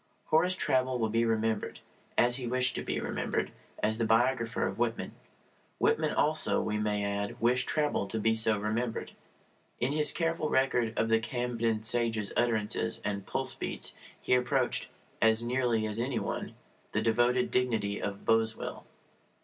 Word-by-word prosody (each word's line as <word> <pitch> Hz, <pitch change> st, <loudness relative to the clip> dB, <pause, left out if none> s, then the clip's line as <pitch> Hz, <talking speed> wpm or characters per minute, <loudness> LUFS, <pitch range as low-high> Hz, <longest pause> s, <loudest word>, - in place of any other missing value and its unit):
Horace 180 Hz, +4 st, +4 dB
Traubel 130 Hz, -6 st, +1 dB
will 110 Hz, -2 st, -1 dB
be 115 Hz, +1 st, +2 dB
remembered, 110 Hz, -1 st, -1 dB, 0.4 s
as 120 Hz, +1 st, +4 dB
he 125 Hz, -2 st, -4 dB
wished 125 Hz, +1 st, +1 dB
to -, -, -3 dB
be -, -, -2 dB
remembered, -, -, -2 dB, 0.3 s
as 110 Hz, +1 st, +1 dB
the -, -, +1 dB
biographer 115 Hz, +1 st, +2 dB
of -, -, -4 dB
Whitman. 120 Hz, -1 st, -1 dB, 0.7 s
Whitman -, -, +2 dB
also, 155 Hz, +1 st, +2 dB
we 105 Hz, 0 st, -1 dB
may 105 Hz, -1 st, 0 dB
add, 100 Hz, 0 st, -3 dB
wished 125 Hz, +2 st, +1 dB
Traubel 150 Hz, -9 st, 0 dB
to 110 Hz, -, -2 dB
be 110 Hz, +1 st, +2 dB
so 110 Hz, -1 st, +4 dB
remembered. 110 Hz, +3 st, -2 dB, 0.7 s
In 125 Hz, +3 st, 0 dB
his 150 Hz, 0 st, +2 dB
careful 165 Hz, -2 st, -1 dB
record 125 Hz, -4 st, +1 dB
of 115 Hz, -, +1 dB
the 115 Hz, 0 st, +4 dB
Camden 115 Hz, -2 st, -2 dB
sage's 115 Hz, -2 st, +1 dB
utterances 110 Hz, -3 st, 0 dB
and 100 Hz, -1 st, -3 dB
pulse -, -, -1 dB
beats -, -, +1 dB, 0.3 s
he -, -, 0 dB
approached 125 Hz, 0 st, +1 dB, 0.3 s
(as 110 Hz, 0 st, +4 dB
nearly 120 Hz, -2 st, 0 dB
as 105 Hz, +1 st, -2 dB
any 125 Hz, +4 st, -1 dB
one) -, -, -4 dB, 0.4 s
the -, -, +1 dB
devoted 120 Hz, +2 st, +2 dB
dignity 110 Hz, -5 st, 0 dB
of 100 Hz, -1 st, -5 dB
Boswell. 115 Hz, 0 st, 0 dB
115 Hz, 155 wpm, -30 LUFS, 110-125 Hz, 0.7 s, Horace